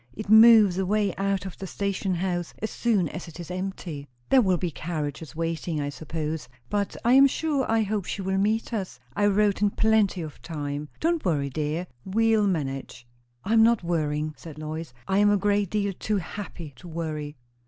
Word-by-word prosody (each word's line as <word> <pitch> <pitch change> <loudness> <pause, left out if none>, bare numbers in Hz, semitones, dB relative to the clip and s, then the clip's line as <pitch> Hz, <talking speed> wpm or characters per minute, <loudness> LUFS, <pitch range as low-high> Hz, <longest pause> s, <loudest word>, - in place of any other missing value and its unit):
It 215 -1 -7
moves 220 -4 +8
away 200 0 +1
out 195 -1 -1
of 190 - -8
the 190 - -5
station 195 -1 -2
house 175 -1 -2
as 220 - -3
soon 210 -8 +1
as 180 - -7
it 165 +1 -11
is 175 0 -7
empty." 180 -6 -5 0.2
"There 265 - +6
will 190 -5 +2
be 175 -1 -2
carriages 155 0 -5
waiting, 165 0 -2
I 145 -1 -2
suppose. 155 0 -4 0.2
But 205 -1 -1
I 240 - +5
am 275 +1 +8
sure 285 -1 -1
I 225 -1 +3
hope 205 -2 -2
she 195 - -4
will 190 +1 0
meet 220 +4 0
us. 190 - -4 0.2
I 205 0 +3
wrote 205 0 +2
in 205 - +4
plenty 215 -4 +2
of 155 -2 -9
time. 145 -2 -4
Don't 335 0 +1
worry, 145 -6 0
dear! 155 +4 -2 0.2
we'll 220 +1 +2
manage." 135 -8 -3 0.4
"I 215 - -1
am 225 - +6
not 230 -3 +4
worrying," 155 -2 -1
said 160 -3 -10
Lois. 155 0 -5 0.2
"I 190 +1 +2
am 205 0 +5
a 205 - +4
great 205 -1 +1
deal 200 -1 0
too 210 +3 -1
happy 175 -4 -7
to 180 - -12
worry." 155 -3 -4
185 Hz, 195 wpm, -26 LUFS, 160-205 Hz, 0.4 s, moves